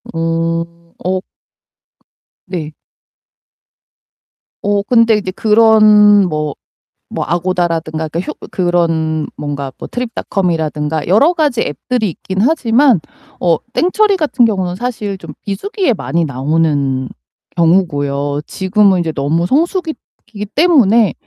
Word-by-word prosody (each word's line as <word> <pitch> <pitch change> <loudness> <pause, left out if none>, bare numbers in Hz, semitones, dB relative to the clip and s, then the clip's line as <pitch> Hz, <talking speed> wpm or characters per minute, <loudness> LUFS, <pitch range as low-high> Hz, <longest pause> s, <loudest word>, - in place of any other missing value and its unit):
음. 165 0 0 0.4
어 185 0 0 1.3
네. 165 -5 -5 1.9
어 205 0 +1
근데 230 -1 +4
이제 185 -3 -4
그런 210 -2 +5
뭐 150 -2 -2 0.6
뭐 - - -2
아고다라든가 170 -3 -1
그러니까 170 +4 -4 0.2
그런 165 -3 0 0.6
트립닷컴이라든가 160 -10 -2
여러 280 - +4
가지 295 -8 0
앱들이 215 - -1
있긴 190 +4 -6
하지만 250 - +3 0.4
어 170 -3 +3 0.2
땡처리 400 +3 +2
같은 285 -8 +2
경우는 185 -5 -1
사실 215 -5 -4
좀 165 -4 -10
비수기에 310 - -2
많이 170 -5 -1
나오는 140 -2 0 0.5
경우고요. 145 -5 +1
지금은 190 -1 +2
이제 165 - -2
너무 155 +4 -1
성수기이기 310 - -3
때문에 235 - +4
185 Hz, 235 characters per minute, -15 LUFS, 160-225 Hz, 1.9 s, 그런